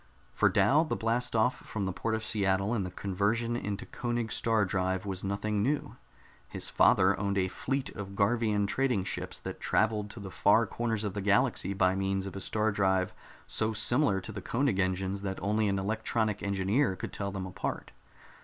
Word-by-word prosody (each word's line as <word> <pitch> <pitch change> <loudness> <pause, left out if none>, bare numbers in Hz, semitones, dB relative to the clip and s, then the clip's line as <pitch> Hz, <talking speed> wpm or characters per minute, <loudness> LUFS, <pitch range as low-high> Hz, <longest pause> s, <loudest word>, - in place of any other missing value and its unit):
For - - +4
Dal 150 +4 +4
the 160 - -2
blast 115 +2 -1
off 110 +3 +3
from 100 -3 -4
the 95 - -2
port 110 +4 -1
of 110 0 -4
Seattle 100 +1 +1
and 110 -5 0
the 90 - -4
conversion 105 +6 -1
into 105 -4 -3
Koenig 120 -2 -3
star 110 -2 +2
drive 95 0 -1
was 95 -1 -4
nothing 100 +1 -1
new. 145 +7 -1 0.5
His - - -3
father - - +5
owned 100 0 0
a 95 -1 +1
fleet 135 +7 -2
of 100 -2 -7
Garvian 105 0 +2
trading 125 -1 +1
ships - - -4
that - - -6
traveled 105 -1 +1
to 115 - -9
the 100 -2 -7
far 105 +5 +4
corners 115 0 -2
of 105 -3 -2
the 105 - -3
galaxy 100 -1 +2
by 95 -1 +3
means 95 0 -1
of 100 - -7
a 95 - -5
star 110 +3 0
drive 95 -2 +1 0.3
so 110 0 0
similar 115 -2 +2
to 110 - -8
the 100 -2 -6
Koenig 115 -1 0
engines 95 +1 0
that 95 -1 -3
only 105 +1 +1
an 100 -1 +1
electronic 110 +1 -1
engineer 100 +4 +1
could - - -6
tell 100 -1 -3
them 95 -1 -4
apart. 95 +2 -4
100 Hz, 190 wpm, -30 LUFS, 95-110 Hz, 0.5 s, father